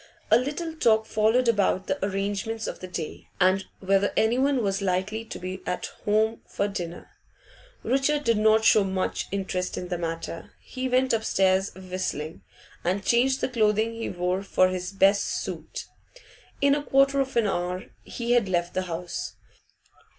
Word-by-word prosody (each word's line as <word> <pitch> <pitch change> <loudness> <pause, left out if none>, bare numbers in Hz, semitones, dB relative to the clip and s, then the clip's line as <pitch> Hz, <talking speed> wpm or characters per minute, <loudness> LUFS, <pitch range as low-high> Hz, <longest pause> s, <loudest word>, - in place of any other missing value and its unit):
A - - +8
little 300 +5 -3
talk 220 -8 +3
followed 220 +4 +2
about 200 -4 +2
the 190 - -2
arrangements 200 +3 -2
of - - -5
the 185 - -7
day, 170 -3 -6
and 190 +1 +4 0.2
whether 195 +1 +2
anyone 255 +3 +2
was 195 0 0
likely 195 +4 -1
to - - -7
be 185 +1 -6
at 180 - -3
home 220 +2 +2
for 200 - -1
dinner. 175 -4 -6 0.7
Richard 275 +3 +1
did 230 -5 +2
not 220 +1 +4
show 215 -2 +6
much 190 -1 -2
interest 190 -2 -2
in 180 - -5
the 175 -2 -2
matter; 165 0 -5
he 260 0 -5
went 255 0 +2
upstairs 195 -3 +2
whistling, 185 -4 -4 0.4
and 190 +2 -1
changed 260 +3 +3
the - - +1
clothing 220 -1 +2
he 230 0 -4
wore 180 +1 -1
for 185 -1 +3
his 185 0 -3
best 195 +1 +4
suit. - - -4 0.8
In 280 0 +5
a 290 - +1
quarter 275 0 +3
of 265 -2 -1
an 230 - +4
hour 180 -1 -1 0.2
he 235 0 -4
had 240 -5 +3
left 175 -1 0
the 185 - 0
house. 170 +1 -4
200 Hz, 165 wpm, -26 LUFS, 185-230 Hz, 0.8 s, A